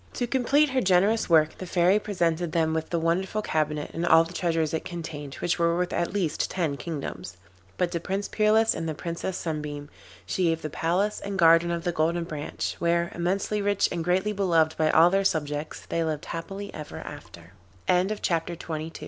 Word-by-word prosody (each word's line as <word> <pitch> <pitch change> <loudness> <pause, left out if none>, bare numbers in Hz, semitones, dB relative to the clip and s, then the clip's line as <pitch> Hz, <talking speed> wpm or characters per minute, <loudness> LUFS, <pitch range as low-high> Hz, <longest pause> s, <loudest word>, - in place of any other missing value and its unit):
To 245 - -1
complete 270 +4 +2
her 260 0 +1
generous 195 +3 +3
work 155 -2 +4
the 185 - -6
Fairy 180 +4 +3
presented 175 -5 -1
them 160 -2 +2
with 160 0 -2
the 170 - 0
wonderful 185 +6 0
cabinet 150 -3 -1
and 165 - -3
all 165 -1 +6
the 165 +1 -9
treasures 165 -3 0
it 160 - -1
contained, 160 -5 -6
which 175 - -1
were 170 0 +2
worth 180 0 -1
at 170 - -1
least 190 -6 -1
ten 165 -6 -1
kingdoms. 140 - -6 0.4
But 180 -1 0
to 170 - -1
Prince 195 +4 -3
Peerless 220 +1 +3
and 165 - -3
the 155 - -3
Princess 170 +3 -4
Sunbeam 150 -2 -5 0.3
she 185 - 0
gave 165 -1 0
the 155 - -4
palace 185 +8 0
and 200 -1 -5
garden 165 -1 +5
of 170 -1 -2
the 175 - 0
Golden 170 +1 0
Branch, 155 -3 -4
where, 170 0 +1
immensely 195 +4 -1
rich 200 0 +2
and 170 -2 -2
greatly 190 +5 +1
beloved 165 -5 +2
by 155 -1 +2
all 165 +3 +6
their 195 +1 +2
subjects, 150 -4 -2
they 165 - -1
lived 155 -1 -3
happily 195 +4 -6
ever 150 - -8
after. 85 +1 -10 0.3
Le - - +4
Rameau - - -3
d'Or. 165 -5 -2
170 Hz, 195 wpm, -26 LUFS, 160-190 Hz, 0.4 s, all